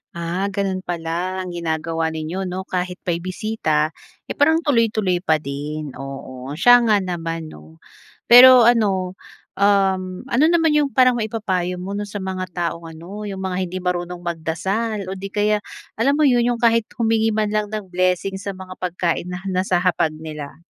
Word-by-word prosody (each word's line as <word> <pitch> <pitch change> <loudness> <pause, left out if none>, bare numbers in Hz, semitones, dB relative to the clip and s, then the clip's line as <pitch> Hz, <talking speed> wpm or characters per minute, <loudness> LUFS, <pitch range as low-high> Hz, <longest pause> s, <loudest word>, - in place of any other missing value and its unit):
Ah, 170 +3 -2
ganon 195 -1 -2
pala 175 +1 -3
ang 180 - -6
ginagawa 165 -1 -2
ninyo 160 +4 -4
'no, 185 +1 -4
kahit 180 -1 -3
may 170 -1 -1
bisita, 175 -5 -1 0.4
eh, - - -4
parang 320 +3 +3
tuloy-tuloy 220 - +1
pa 160 -3 +2
din, 150 0 -5
oo 135 0 -7
siya 245 +9 +7
nga 210 -1 +5
naman 165 -3 -4
'no. 75 +1 -14 0.5
Pero 250 +1 +10
ano 200 -6 +2 0.4
um, 190 -1 +2
ano 260 +4 +2
naman 330 -2 +3
yung 295 -2 +3
parang 255 -2 +4
maipapayo 195 -5 -2
mo 180 +2 -6
'no, 205 +1 -3
sa 200 -1 -6
mga 185 -1 -3
taong 170 -1 -3
ano 180 +6 -8
yung 190 -1 -5
mga 185 -1 -2
hindi 185 +2 -5
marunong 175 0 -3
magdasal, 190 +5 -2
o - - -4
'di 195 +1 -6
kaya 210 0 +1 0.4
alam 275 +4 +3
mo 305 - +2
yun, 245 -3 +3
yung 230 - -9
kahit 230 -1 +3
humingi 225 -2 +1
man 215 -1 0
lang 210 0 0
ng 205 -3 -6
blessing 185 +1 0
sa 200 0 -5
mga 185 0 -10
pagkain 175 -1 -2
na 180 +1 -6
nasa 185 0 0
hapag 165 -3 +1
nila? 150 -3 -8
185 Hz, 170 wpm, -21 LUFS, 170-215 Hz, 0.5 s, Pero